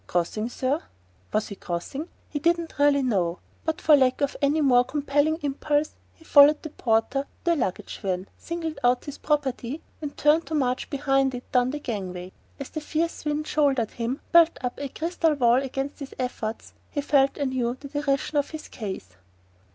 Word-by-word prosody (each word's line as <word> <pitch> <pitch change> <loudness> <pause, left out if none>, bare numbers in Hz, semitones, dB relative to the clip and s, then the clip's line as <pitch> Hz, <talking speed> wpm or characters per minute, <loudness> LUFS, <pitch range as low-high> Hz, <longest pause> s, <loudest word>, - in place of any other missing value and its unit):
"Crossing, 195 +6 -1
sir?" 265 +5 -1 0.5
Was 215 0 0
he 200 - -6
crossing? 190 - -4 0.2
He 290 - -4
really 340 0 +3
didn't 285 -3 +2
know; 180 -7 +1 0.3
but 320 -1 -1
for 310 - +6
lack 260 -1 +3
of 285 0 0
any 290 +2 +3
more 250 -4 +5
compelling 290 +3 +1
impulse 290 +1 0 0.2
he 320 - -20
followed 290 0 +7
the 315 - -6
porter 225 +1 +1
to - - -33 0.2
the 340 -1 +3
luggage 195 - -3
van, 185 -1 -2
singled 325 -2 -5
out 245 0 +3
his 290 - -7
property, 285 -2 -1 0.2
and 295 -2 -6
turned 305 +3 +3
to 320 - -2
march 255 -3 0
behind 270 -2 +1
it 245 - -9
down 250 0 +3
the 290 - -3
gang 210 -10 -4
way. 180 +1 -7 0.3
As 275 - -6
the 310 - -4
fierce 320 +1 -2
wind 300 0 -1
shouldered 275 -8 +1
him, 240 +3 -3
building 335 -1 +6
up 250 -1 -3
a 285 - -3
crystal 325 +1 0
wall 245 -1 +4
against 270 +1 -4
his 280 -2 -8
efforts, 240 -3 -4 0.2
he 290 - -2
felt 275 -1 +3
anew 260 -3 -1
the 280 - -9
derision 290 0 0
of 285 - -1
his 315 -1 -8
case. 195 - -6
275 Hz, 185 wpm, -26 LUFS, 245-300 Hz, 0.5 s, followed